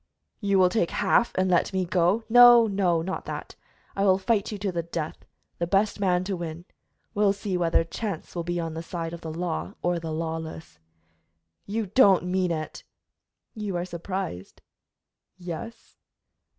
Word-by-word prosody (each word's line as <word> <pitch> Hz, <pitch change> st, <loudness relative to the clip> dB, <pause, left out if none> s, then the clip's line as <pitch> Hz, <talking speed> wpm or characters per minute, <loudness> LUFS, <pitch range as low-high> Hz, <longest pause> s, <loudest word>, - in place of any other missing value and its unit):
"You 200 Hz, -2 st, +1 dB
will 185 Hz, -1 st, +5 dB
take 180 Hz, -3 st, +1 dB
half 235 Hz, -, +2 dB
and 185 Hz, 0 st, +2 dB
let 180 Hz, -2 st, +2 dB
me 190 Hz, -1 st, 0 dB
go 180 Hz, +5 st, +2 dB
" -, -, -37 dB
"No, 240 Hz, 0 st, +8 dB
no, 185 Hz, -5 st, +1 dB
not 190 Hz, +2 st, -4 dB
that; -, -, -6 dB, 0.4 s
I 195 Hz, -, 0 dB
will 190 Hz, -2 st, +5 dB
fight 200 Hz, +1 st, 0 dB
you 210 Hz, -, -4 dB
to 200 Hz, -1 st, -2 dB
the 170 Hz, -1 st, -1 dB
death, 165 Hz, -2 st, -5 dB, 0.3 s
the 170 Hz, -, -1 dB
best 200 Hz, +3 st, +1 dB
man 180 Hz, -2 st, +2 dB
to 195 Hz, +1 st, -2 dB
win. 170 Hz, 0 st, -6 dB, 0.5 s
We'll 205 Hz, -1 st, +3 dB
see 200 Hz, -1 st, -4 dB
whether 170 Hz, -2 st, +2 dB
chance 190 Hz, +1 st, -5 dB
will 170 Hz, -, -3 dB
be 175 Hz, +1 st, -2 dB
on 165 Hz, -1 st, -3 dB
the 165 Hz, -, -5 dB
side 165 Hz, -1 st, -5 dB
of 170 Hz, -, -8 dB
the 160 Hz, -, -6 dB
law 155 Hz, -, -3 dB
or 175 Hz, -1 st, +1 dB
the 165 Hz, -1 st, -6 dB
lawless." 160 Hz, -, -5 dB, 0.9 s
"You 220 Hz, +2 st, -1 dB
don't 200 Hz, -3 st, +5 dB
mean 180 Hz, 0 st, 0 dB
it!" 155 Hz, -2 st, -4 dB, 0.7 s
"You 210 Hz, -4 st, -4 dB
are 175 Hz, 0 st, -1 dB
surprised?" 175 Hz, -, -6 dB, 0.7 s
"Yes." 180 Hz, +6 st, -8 dB
180 Hz, 175 wpm, -26 LUFS, 170-200 Hz, 0.9 s, No